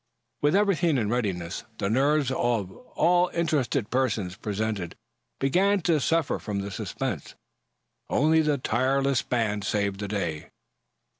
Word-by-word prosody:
With 145 +4 +3
everything 180 -7 +3
in 110 -3 0
readiness, 95 -8 -2
the - - -1
nerves 135 +4 +2
of 115 -7 0
all 175 - +1
the 170 - -4
interested 145 -7 0
persons 115 -8 0
present 105 -4 -3 0.4
began 190 +9 +3
to 165 -2 +2
suffer 165 +1 +1
from 100 -2 -3
the 100 +1 -5
suspense. - - -4 0.7
Only 160 +3 +3
the 150 -2 +1
tireless 130 +2 +1
band 110 -4 -1
saved 100 -1 -1
the 100 - -3
day. 90 -7 -3
125 Hz, 135 wpm, -26 LUFS, 105-150 Hz, 0.7 s, With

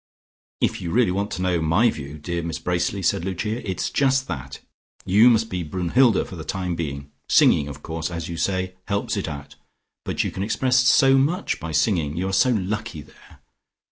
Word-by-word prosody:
"If - - 0
you 85 - -4
really 115 0 +2
want 100 +2 -1
to 90 - -3
know 90 -2 +1
my 85 +9 +3
view, 70 0 -8
dear 85 +3 -4
Miss 85 -1 -4
Bracely," 90 +2 -1
said 85 - +1
Lucia, 105 +4 -3
"it's 95 - -2
just 135 -1 +2
that. 70 +1 -6 0.5
You 105 +6 +6
must 115 -1 +2
be 90 -5 -3
Brunnhilde 95 - +2
for - - -9
the 80 - -7
time 90 +1 -3
being. 70 -4 -5 0.2
Singing, 70 - +4
of 70 0 -9
course, 80 0 -4
as 85 -1 -5
you 85 - -5
say, 95 +2 -1
helps 100 +1 -1
it 100 - -3
out: 70 -2 -8 0.5
you - - -1
can 95 - -6
express 125 +5 +1
so 135 +2 +5
much 170 +8 0
by 80 -2 -6
singing. 75 -1 +1
You 95 +2 -1
are - - -4
so 95 +7 +4
lucky 105 -6 -2
there. - - -20
90 Hz, 195 wpm, -23 LUFS, 80-110 Hz, 0.5 s, You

